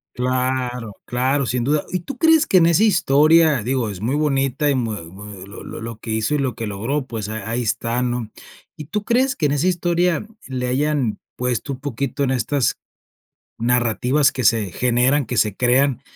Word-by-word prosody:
Claro, 125 -3 -1
claro, 130 +3 0
sin 120 0 -1
duda. 145 +4 0
¿Y 180 - -1
tú 255 +8 -8
crees 320 +1 +5
que 185 - +4
en 165 - +6
esa 170 +5 +4
historia? 155 - +4
Digo, 125 -1 -1
es 100 -2 -7
muy 120 +6 0
bonita 145 -1 +1
y 140 - +2
muy 110 -8 -2
muy 100 0 -10
lo 100 - -10
lo - - -8
lo 115 -1 -7
que 115 - -9
hizo 110 +6 0
y - - 0
lo 130 -5 -1
que 115 -3 -4
logró, 120 +8 -2
pues, 110 -4 -5
a 110 +1 -5
ahí 120 +2 -1
está, 115 +2 -1
¿no? 120 -3 -2 0.5
¿Y 150 - -8
tú 210 +7 -3
crees 255 +2 +2
que 155 - -1
en 145 - +2
esa 145 +5 +1
historia 175 0 +1 0.2
le 125 -1 -3
hayan 135 -3 0 0.2
puesto 125 +2 -2
un 125 - -9
poquito 140 0 -3
en 130 - +1
estas 130 0 0 0.8
narrativas 125 +4 +2
que 130 - -4
se 110 -5 +2
generan, 125 +3 +2
que 125 - -4
se 105 -3 +2
crean, 130 +1 +2
130 Hz, 195 wpm, -21 LUFS, 115-150 Hz, 0.8 s, en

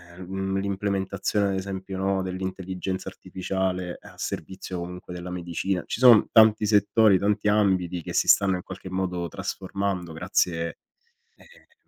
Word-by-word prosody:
ehm, 95 - -9
mhmm, 95 +1 -2
l'implementazione 100 +1 -1
ad 95 - -1
esempio, 95 0 -5
no, 95 0 0
dell'intelligenza 95 0 -4
artificiale 95 -1 -3
a - - -15
servizio 90 +1 -5
comunque 90 +1 -7
della 90 0 -6
medicina 90 +1 -2
ci - - -4
son 120 -4 +7
tanti 110 -1 +6
settori, 105 0 +4
tanti 105 +1 +1
ambiti 95 -4 +2
che - - -7
si - - +2
stanno 95 -1 +5
in 90 - -5
qualche 95 - -9
modo 90 -2 -2
trasformando 95 -2 -3
grazie, 85 0 -1 0.6
ehm 485 -1 -21
95 Hz, 140 wpm, -25 LUFS, 90-100 Hz, 0.6 s, son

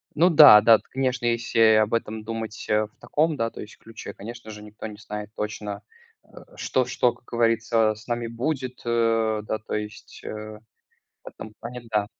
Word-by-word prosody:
Ну 170 +4 +5
да, 145 -10 +9
да, 115 +1 +7
т - - -24
конечно, 130 -2 -1
если 115 -1 0 0.2
об 110 0 +2
этом 110 -1 -2
думать 110 -1 -6
в 105 0 +1
таком 155 +1 0
да, 115 -2 -1
то - - -10
есть 105 - -11
ключе, 115 -2 -10
конечно 115 +2 -10
же, 105 0 -10
никто 105 +1 -9
не 105 -1 -10
знает 105 0 -7
точно, 105 -1 -5 0.7
что 130 -1 0
что, 125 -1 +1
как - - -25
говорится, 115 -2 +1
с 110 +2 -16
нами 120 -1 -2
будет, 130 +2 -4
э, 115 -2 +1
да, 110 - -2
то 110 - -5
есть, 105 0 -7
э, - - -6 0.9
в - - -7
этом 110 - -11
плане 125 +2 -7
да. 105 -2 +1
115 Hz, 180 wpm, -24 LUFS, 105-120 Hz, 0.9 s, да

